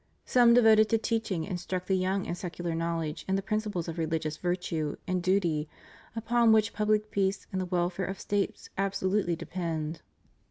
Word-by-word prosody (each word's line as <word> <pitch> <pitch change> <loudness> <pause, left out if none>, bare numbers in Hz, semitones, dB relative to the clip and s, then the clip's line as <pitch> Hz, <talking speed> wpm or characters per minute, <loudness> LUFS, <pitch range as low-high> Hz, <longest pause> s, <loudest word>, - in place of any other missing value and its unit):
Some 240 -2 +5
devoted 220 -2 +6
to 225 - +3
teaching 220 -6 -1
instruct 180 +1 -4
the 195 - +1
young 190 +1 0
in - - -3
secular 175 -1 -4
knowledge 165 -2 -2
and 190 0 +1
the 195 - -3
principles 210 -4 -2
of 165 0 -5
religious 160 -1 -1
virtue 175 -4 -2
and 185 -1 -1
duty, 175 -5 +1 0.5
upon 230 +1 +3
which 215 -1 +3
pubhc 215 0 +1
peace 195 0 0
and 190 - -1
the 185 - -3
weKare 180 +1 -1
of 195 - -5
States 205 -1 -2
absolutely 195 -2 0
depend. 165 -2 -4
185 Hz, 165 wpm, -29 LUFS, 170-210 Hz, 0.5 s, devoted